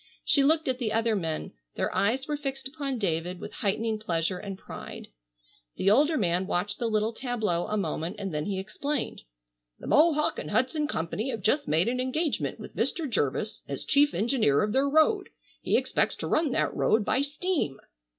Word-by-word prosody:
She 280 Hz, -, +4 dB
looked 315 Hz, +2 st, +3 dB
at 255 Hz, -1 st, 0 dB
the 225 Hz, -4 st, -1 dB
other 225 Hz, 0 st, +2 dB
men. 165 Hz, -5 st, -3 dB, 0.2 s
Their -, -, -1 dB
eyes 250 Hz, +7 st, +1 dB
were 300 Hz, -, -1 dB
fixed 270 Hz, -2 st, -4 dB
upon 275 Hz, -2 st, -4 dB
David 175 Hz, -3 st, -1 dB
with -, -, -8 dB
heightening 215 Hz, +2 st, 0 dB
pleasure 180 Hz, -2 st, -1 dB
and 195 Hz, -2 st, -6 dB
pride. -, -, -9 dB, 0.7 s
The 195 Hz, -, +3 dB
older 300 Hz, +7 st, +4 dB
man 180 Hz, -2 st, +1 dB
watched 200 Hz, +4 st, -1 dB
the 235 Hz, -, 0 dB
little 215 Hz, +1 st, +1 dB
tableau 220 Hz, -8 st, -1 dB
a 215 Hz, -, -1 dB
moment 170 Hz, 0 st, -2 dB
and 195 Hz, -4 st, -4 dB
then 150 Hz, 0 st, -1 dB
he 200 Hz, -2 st, -2 dB
explained: 235 Hz, +8 st, -3 dB, 0.6 s
"The -, -, -11 dB
Mohawk 305 Hz, 0 st, +3 dB
and -, -, -5 dB
Hudson 295 Hz, +4 st, +1 dB
Company 205 Hz, -, -2 dB
have 230 Hz, -5 st, -3 dB
just 285 Hz, +8 st, +2 dB
made 160 Hz, +6 st, +2 dB
an 250 Hz, +1 st, 0 dB
engagement 290 Hz, +5 st, -1 dB
with -, -, -10 dB
Mr. 330 Hz, -4 st, 0 dB
Jervis 215 Hz, -, -1 dB
as -, -, -5 dB
chief 290 Hz, 0 st, +4 dB
engineer 215 Hz, -, +2 dB
of 210 Hz, 0 st, -1 dB
their 275 Hz, +1 st, +3 dB
road. 315 Hz, +7 st, +3 dB, 0.3 s
He -, -, +2 dB
expects -, -, +1 dB
to -, -, -5 dB
run 315 Hz, -1 st, +2 dB
that -, -, +1 dB
road 215 Hz, -1 st, +2 dB
by 260 Hz, -, +2 dB
steam!" 290 Hz, -, -1 dB
225 Hz, 190 wpm, -28 LUFS, 195-280 Hz, 0.7 s, She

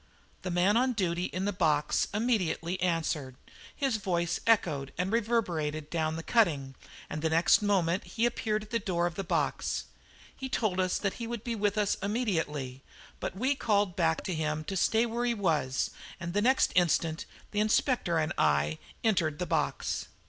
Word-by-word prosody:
The 185 Hz, -, -4 dB
man 180 Hz, +5 st, +3 dB
on 255 Hz, +1 st, +2 dB
duty 180 Hz, -4 st, 0 dB
in 185 Hz, +1 st, -3 dB
the 205 Hz, -, 0 dB
box 155 Hz, -5 st, +2 dB
immediately 195 Hz, -5 st, 0 dB
answered. 160 Hz, -6 st, -1 dB, 0.4 s
His 270 Hz, -6 st, 0 dB
voice 175 Hz, -4 st, -1 dB
echoed 145 Hz, -11 st, +2 dB
and 180 Hz, +2 st, -1 dB
reverberated 170 Hz, -10 st, 0 dB
down 160 Hz, -1 st, 0 dB
the 165 Hz, -, -5 dB
cutting, 150 Hz, -, +2 dB, 0.3 s
and 155 Hz, -, -5 dB
the 160 Hz, -, +1 dB
next 165 Hz, +5 st, +4 dB
moment 190 Hz, -3 st, +1 dB
he 230 Hz, 0 st, 0 dB
appeared 215 Hz, -3 st, 0 dB
at 210 Hz, -, -15 dB
the 230 Hz, -, +1 dB
door 175 Hz, -4 st, 0 dB
of 175 Hz, -, -1 dB
the 195 Hz, -, -4 dB
box. 180 Hz, -, -1 dB, 0.5 s
He 265 Hz, -, -5 dB
told 210 Hz, -7 st, 0 dB
us 185 Hz, -1 st, +1 dB
that 195 Hz, -2 st, -1 dB
he 230 Hz, -, -3 dB
would 235 Hz, -2 st, -5 dB
be 235 Hz, -, -2 dB
with 205 Hz, -1 st, 0 dB
us 205 Hz, -1 st, +1 dB
immediately; 160 Hz, -, -2 dB, 0.4 s
but 190 Hz, -, -4 dB
we 260 Hz, +6 st, +2 dB
called 205 Hz, -8 st, +1 dB
back 165 Hz, -2 st, +1 dB
to 185 Hz, -, -2 dB
him 155 Hz, -1 st, -1 dB
to 195 Hz, -, -4 dB
stay 220 Hz, +5 st, +3 dB
where 235 Hz, +1 st, -2 dB
he 240 Hz, -1 st, +1 dB
was, 155 Hz, -, 0 dB, 0.3 s
and 170 Hz, 0 st, -5 dB
the 205 Hz, -, +2 dB
next 260 Hz, +4 st, +3 dB
instant 165 Hz, -2 st, +2 dB, 0.3 s
the 210 Hz, -, -1 dB
Inspector 215 Hz, -, +2 dB
and 155 Hz, -1 st, 0 dB
I 75 Hz, +1 st, +2 dB, 0.2 s
entered 170 Hz, -9 st, +2 dB
the 180 Hz, -, -2 dB
box. -, -, -1 dB
185 Hz, 180 wpm, -30 LUFS, 160-215 Hz, 0.5 s, next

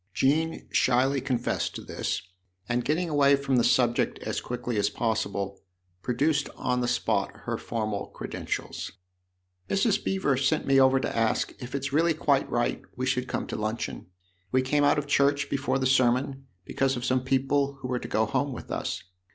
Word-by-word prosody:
Jean 160 Hz, +4 st, +1 dB
shyly 130 Hz, +2 st, +3 dB
confessed 125 Hz, -2 st, -1 dB
to -, -, -5 dB
this, -, -, -3 dB, 0.4 s
and 120 Hz, 0 st, 0 dB
getting 160 Hz, +6 st, 0 dB
away 140 Hz, -2 st, +4 dB
from 140 Hz, -2 st, 0 dB
the 120 Hz, -, +4 dB
subject 120 Hz, -1 st, +2 dB
as -, -, -2 dB
quickly 125 Hz, -1 st, -4 dB
as 100 Hz, 0 st, +2 dB
possible, 100 Hz, -3 st, -2 dB, 0.4 s
produced 140 Hz, -, +1 dB
on 125 Hz, 0 st, 0 dB
the 120 Hz, -, 0 dB
spot -, -, +1 dB
her -, -, -2 dB
formal 110 Hz, -3 st, -3 dB
credentials. -, -, -5 dB, 0.4 s
" 90 Hz, 0 st, -44 dB
Mrs. 195 Hz, +1 st, +2 dB
Beever 185 Hz, -9 st, +1 dB
sent 140 Hz, +4 st, +1 dB
me 135 Hz, 0 st, +4 dB
over 130 Hz, 0 st, +5 dB
to -, -, -3 dB
ask 115 Hz, -1 st, +1 dB
if 125 Hz, +1 st, -6 dB
it's 140 Hz, 0 st, -3 dB
really 165 Hz, +2 st, +3 dB
quite 140 Hz, -3 st, +1 dB
right 120 Hz, 0 st, 0 dB
we 130 Hz, -, -2 dB
should 130 Hz, -1 st, 0 dB
come -, -, -2 dB
to -, -, -5 dB
luncheon. 105 Hz, -, -3 dB, 0.4 s
We 130 Hz, 0 st, +3 dB
came 145 Hz, +3 st, +2 dB
out 145 Hz, +1 st, +4 dB
of 150 Hz, -, -1 dB
church 145 Hz, 0 st, +2 dB
before 140 Hz, 0 st, 0 dB
the 130 Hz, -, -1 dB
sermon, 130 Hz, +1 st, +2 dB, 0.2 s
because 135 Hz, -1 st, 0 dB
of 120 Hz, -, -4 dB
some 130 Hz, 0 st, +1 dB
people 135 Hz, +1 st, +1 dB
who -, -, -4 dB
were 125 Hz, -1 st, -1 dB
to -, -, -7 dB
go 110 Hz, -, +1 dB
home 140 Hz, +5 st, -1 dB
with -, -, -8 dB
us. -, -, -3 dB
130 Hz, 185 wpm, -27 LUFS, 120-140 Hz, 0.4 s, over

